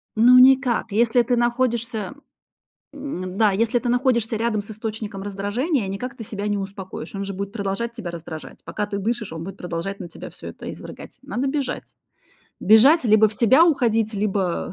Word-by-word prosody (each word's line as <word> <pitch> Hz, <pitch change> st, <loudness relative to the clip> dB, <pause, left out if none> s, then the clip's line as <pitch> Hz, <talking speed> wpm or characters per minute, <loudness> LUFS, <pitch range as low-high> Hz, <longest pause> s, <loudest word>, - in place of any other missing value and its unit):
Ну 245 Hz, +3 st, +7 dB
никак. 255 Hz, -4 st, +4 dB
Если 235 Hz, +3 st, +3 dB
ты 245 Hz, +1 st, +1 dB
находишься 240 Hz, -2 st, -1 dB, 0.8 s
М, 195 Hz, -11 st, -6 dB
да, 215 Hz, -1 st, +4 dB
если 225 Hz, +4 st, +1 dB
ты 245 Hz, -, -4 dB
находишься 240 Hz, -3 st, +1 dB
рядом 220 Hz, -2 st, 0 dB
с 205 Hz, -, -11 dB
источником 215 Hz, -2 st, -5 dB
раздражения, 205 Hz, -, -1 dB
никак 245 Hz, +7 st, -5 dB
ты 225 Hz, -, -7 dB
себя 205 Hz, 0 st, -4 dB
не 205 Hz, 0 st, 0 dB
успокоишь. 195 Hz, 0 st, -7 dB
Он 195 Hz, 0 st, -3 dB
же 195 Hz, -, -5 dB
будет 200 Hz, +1 st, -5 dB
продолжать 210 Hz, +2 st, -3 dB
тебя 200 Hz, -7 st, -6 dB
раздражать. 160 Hz, -2 st, -9 dB
Пока 210 Hz, -, -3 dB
ты 205 Hz, -1 st, -4 dB
дышишь, 220 Hz, -2 st, -2 dB
он 165 Hz, 0 st, -6 dB
будет 195 Hz, +1 st, -8 dB
продолжать 180 Hz, +3 st, -5 dB
на 175 Hz, -, -6 dB
тебя -, -, -10 dB
всё -, -, -10 dB
это -, -, -8 dB
извергать. -, -, -10 dB
Надо 265 Hz, +3 st, -3 dB
бежать. 270 Hz, -2 st, -3 dB, 0.7 s
Бежать, 255 Hz, +8 st, +6 dB
либо 215 Hz, 0 st, +5 dB
в 210 Hz, -, -8 dB
себя 260 Hz, +9 st, +5 dB
уходить, 225 Hz, -8 st, +1 dB
либо 195 Hz, -4 st, -1 dB
220 Hz, 180 wpm, -22 LUFS, 200-240 Hz, 0.8 s, Ну